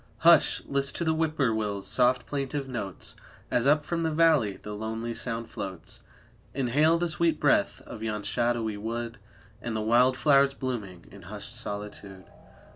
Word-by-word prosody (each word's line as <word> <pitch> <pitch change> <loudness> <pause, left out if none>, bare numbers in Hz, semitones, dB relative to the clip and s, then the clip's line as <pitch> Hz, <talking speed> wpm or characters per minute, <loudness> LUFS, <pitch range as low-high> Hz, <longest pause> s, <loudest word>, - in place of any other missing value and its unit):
Hush! - - +5
list 140 0 0
to - - -2
the 160 -1 +2
Whip 160 -1 -1
poor 130 -6 +2
will's 105 -2 -2
soft 125 -1 +2
plaintive 140 0 -3
notes, 110 -7 -5 0.4
As 125 +2 +2
up 150 +1 +4
from 170 -1 -2
the 160 - +1
valley 155 -10 +3
the 105 - -7
lonely 110 +2 -4
sound 115 0 -2
floats, 95 -7 -7 0.5
Inhale 145 +5 +3
the 175 +1 0
sweet 170 0 +1
breath - - +2
of - - -10
yon 105 -2 -3
shadowy 115 -2 0
wood 115 +1 -4 0.4
And 120 -2 -4
the 110 - -1
wild 125 +4 +4
flowers 140 -1 +4
blooming 110 -10 -5
in - - -12
hushed - - -9
solitude. 100 -2 -6
120 Hz, 165 wpm, -28 LUFS, 110-140 Hz, 0.5 s, Hush